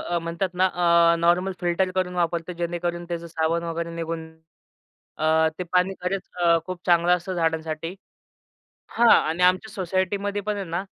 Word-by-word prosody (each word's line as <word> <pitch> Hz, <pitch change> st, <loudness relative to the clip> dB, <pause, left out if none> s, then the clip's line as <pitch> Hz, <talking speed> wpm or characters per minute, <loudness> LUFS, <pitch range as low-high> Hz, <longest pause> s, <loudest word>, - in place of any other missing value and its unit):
अ, 175 Hz, 0 st, -2 dB
म्हणतात 170 Hz, +3 st, -2 dB
ना, 185 Hz, +1 st, +3 dB, 0.5 s
अ, -, -, +2 dB
normal 175 Hz, +3 st, +2 dB
filter 180 Hz, +1 st, 0 dB
करून 180 Hz, -1 st, -1 dB
वापरतो 170 Hz, 0 st, -1 dB
जेणेकरून 175 Hz, 0 st, -3 dB
त्याचं 170 Hz, -1 st, -4 dB
साबण 165 Hz, +1 st, -1 dB
वगैरे 170 Hz, 0 st, -3 dB
निघून. 165 Hz, -1 st, -4 dB, 0.9 s
अ, 160 Hz, +1 st, +3 dB
ते 180 Hz, -, -3 dB
पाणी 180 Hz, +1 st, +2 dB
खरच 190 Hz, +1 st, -3 dB
अ, 170 Hz, -1 st, +5 dB
खूप 185 Hz, -1 st, -6 dB
चांगलं 175 Hz, 0 st, +4 dB
असतं 180 Hz, +2 st, -6 dB
झाडांसाठी. 160 Hz, 0 st, -2 dB, 1.0 s
हां 235 Hz, 0 st, +3 dB
आणि 165 Hz, +3 st, +4 dB
आमच्या 185 Hz, +4 st, +2 dB
सोसायटीमध्ये 195 Hz, +2 st, -1 dB
पण 210 Hz, +1 st, -2 dB
आहे 200 Hz, -2 st, -4 dB
ना, 175 Hz, +3 st, -2 dB
175 Hz, 160 wpm, -24 LUFS, 165-185 Hz, 1.0 s, अ